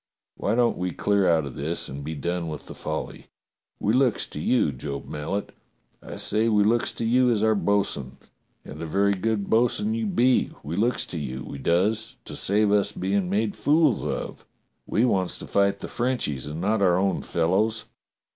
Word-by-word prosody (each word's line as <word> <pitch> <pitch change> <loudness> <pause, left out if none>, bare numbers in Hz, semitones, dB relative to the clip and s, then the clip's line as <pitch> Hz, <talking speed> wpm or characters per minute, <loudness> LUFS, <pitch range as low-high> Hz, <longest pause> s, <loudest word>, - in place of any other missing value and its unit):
Why 105 - -1
don't 120 -1 +2
we 90 0 -1
clear 100 +3 +1
out 80 -3 +3
of 70 - -7
this 80 +6 -4
and 70 +2 -7
be 80 +2 -4
done 85 +3 -2
with 75 -2 -6
the - - -9
folly - - -5
.^^ - - -17 0.6
We 105 - +1
looks 130 -2 +2
to - - -8
you, 80 -2 +2
Job 70 +2 -6
Mallet, 85 +8 -4 0.5
I - - -8
say 110 +2 0
we 105 -2 +4
looks 115 +3 +2
to 115 - -4
you 125 +2 +4
as 110 -3 +1
our 110 0 +4
bo'sun, 100 -11 0 0.5
and 75 +2 -9
a 85 - -4
very 100 +5 +2
good 100 +1 -1
bo'sun 125 - +2
you 225 -1 -1
be, 130 -10 +2
we 75 +4 -4
looks 115 +6 +1
to 85 - -5
you, 65 -3 -5
we 70 - -7
does, 90 +10 +1
to - - -6
save 105 +1 +2
us 105 -1 +3
bein' 95 -1 -1
made 105 +2 0
fools 150 -4 +3
of. - - -4 0.4
We 115 - +2
wants 95 -6 0
to - - -8
fight 100 0 +2
the - - -4
Frenchies 120 - -1
and 75 +2 -5
not 105 +4 +1
our 90 -2 +4
own 95 +1 +1
fellows. 105 +7 0
100 Hz, 195 wpm, -25 LUFS, 85-115 Hz, 0.6 s, we